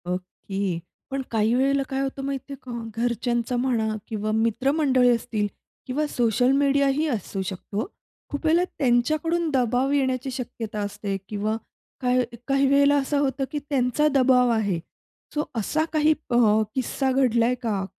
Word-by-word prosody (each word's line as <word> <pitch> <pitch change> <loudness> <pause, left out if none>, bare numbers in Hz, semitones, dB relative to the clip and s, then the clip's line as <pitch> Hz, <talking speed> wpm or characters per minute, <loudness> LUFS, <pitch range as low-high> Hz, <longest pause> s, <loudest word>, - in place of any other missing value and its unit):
okay, 185 0 -3 0.3
पण 270 0 -1
काही 220 0 +2
वेळेला 275 +2 +2
काय 270 0 -1
होतं 270 0 -3
माहिती 275 0 -4
आहे - - -5
का 255 - -8 0.3
घरच्यांचा 240 0 0
म्हणा 240 -3 +1 0.2
किंवा 215 -2 -2
मित्रमंडळी 255 +4 +2
असतील 220 -3 -2 0.4
किंवा 285 +4 0
सोशल 245 -1 +2
मीडिया 280 0 +3
ही 295 +4 +1
असू 210 - -3
शकतो, 200 +3 -4 0.4
खूप 285 +2 -5
वेळेला 330 +3 +4
त्यांच्याकडून 310 +7 +1
दबाव 255 +1 +2
येण्याची 265 -2 0
शक्यता 230 -4 -5
असते 205 -1 -3
किंवा 210 +1 -1 0.5
काही 250 0 +3 0.2
काही 275 0 +3
वेळेला 280 +1 +5
असं 280 +1 0
होतं, 270 -1 0
की 295 - -2
त्यांचा 270 +1 +2
दबाव 255 -2 +4
आहे, 205 -6 0 0.5
सो 300 - 0
असा 270 +8 0
काही 310 0 +4 0.2
अ, 240 - +1 0.4
किस्सा 265 +1 0
घडलाय 250 -2 +3
का, 205 -4 -1
255 Hz, 145 wpm, -24 LUFS, 225-275 Hz, 0.5 s, वेळेला